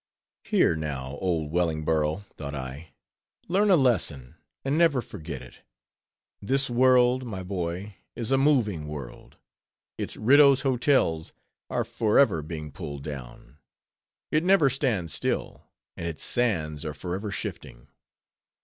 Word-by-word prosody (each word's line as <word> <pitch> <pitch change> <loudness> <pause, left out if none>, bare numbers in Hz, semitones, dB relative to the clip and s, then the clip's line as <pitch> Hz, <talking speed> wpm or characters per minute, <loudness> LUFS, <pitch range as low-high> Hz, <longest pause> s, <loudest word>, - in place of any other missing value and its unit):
Here, - - +3
now, 70 -3 -4
oh, 85 -4 0
Wellingborough, 80 +1 0
thought 70 -1 -6
I, 70 +4 -7 0.5
learn 200 +4 +2
a 190 - +7
lesson, 90 - +1 0.3
and 135 +2 +1
never 160 -5 +4
forget 80 - -7
it. 60 - -15 0.8
This 135 +4 +1
world, 125 +1 +4
my 100 -6 -5
boy, 90 +1 -4 0.2
is 115 +1 -2
a 135 - +4
moving 110 - +2
world; 75 -5 -9 0.6
its - - -4
Riddough's 140 +3 +6
Hotels 125 - +1 0.4
are - - -1
forever 110 - +3
being 75 -1 -7
pulled 70 0 -7
down; 70 -1 -9 0.7
it 155 +1 +2
never 180 -7 +4
stands 110 - -1
still; - - -3 0.3
and 85 - -5
its 80 -3 -5
sands 80 -12 0
are 75 -1 -5
forever 95 +4 -4
shifting. - - -6
90 Hz, 125 wpm, -26 LUFS, 75-130 Hz, 0.8 s, a